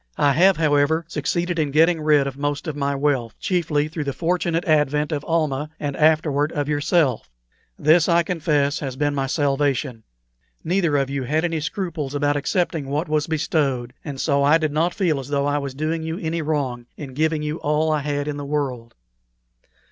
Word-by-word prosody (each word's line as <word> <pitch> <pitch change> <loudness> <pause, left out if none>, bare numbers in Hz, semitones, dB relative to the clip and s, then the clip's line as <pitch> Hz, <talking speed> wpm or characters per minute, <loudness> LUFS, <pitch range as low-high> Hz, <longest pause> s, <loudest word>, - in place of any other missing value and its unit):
I 140 -1 +3
have, 185 +6 +4
however, 155 +1 +2
succeeded 170 +3 -2
in 150 -2 +1
getting 160 +3 +3
rid 150 -2 +4
of 135 -1 -4
most 145 +2 -2
of 155 - -3
my 140 -1 -1
wealth, 135 -5 -1
chiefly 160 -5 0
through 155 -1 -5
the 140 - -2
fortunate 170 0 -1
advent 150 -1 +2
of 145 -2 -2
Almah 155 -3 0
and 145 -2 -3
afterward 155 -1 +2
of 145 -2 -2
yourself. 145 - +1 0.5
This, 160 +2 +4
I 170 0 +4
confess, 150 -4 0
has 135 -3 -4
been 145 +1 0
my 135 -1 -1
salvation. 140 -4 0 0.6
Neither 170 -4 +1
of 135 -1 -1
you 140 -1 -2
had 155 +6 0
any 165 -2 -1
scruples 160 -4 -4
about 145 0 +1
accepting 160 -1 -1
what 150 +5 -2
was 150 -1 0
bestowed, 140 -6 -1
and 140 -3 -6
so 140 -1 +1
I 145 +3 +5
did 155 -2 -1
not 165 +4 0
feel 170 -8 +1
as 130 - -7
though 140 -1 0
I 145 0 +1
was 140 -2 -5
doing 155 +3 -2
you 160 +1 -4
any 165 0 -2
wrong 135 -6 -2
in 135 -3 -8
giving 155 +2 0
you 150 +1 -2
all 150 +1 0
I 155 - +1
had 145 0 -2
in 145 -1 -3
the 145 - -5
world. 135 -5 -3
150 Hz, 195 wpm, -22 LUFS, 140-160 Hz, 0.6 s, I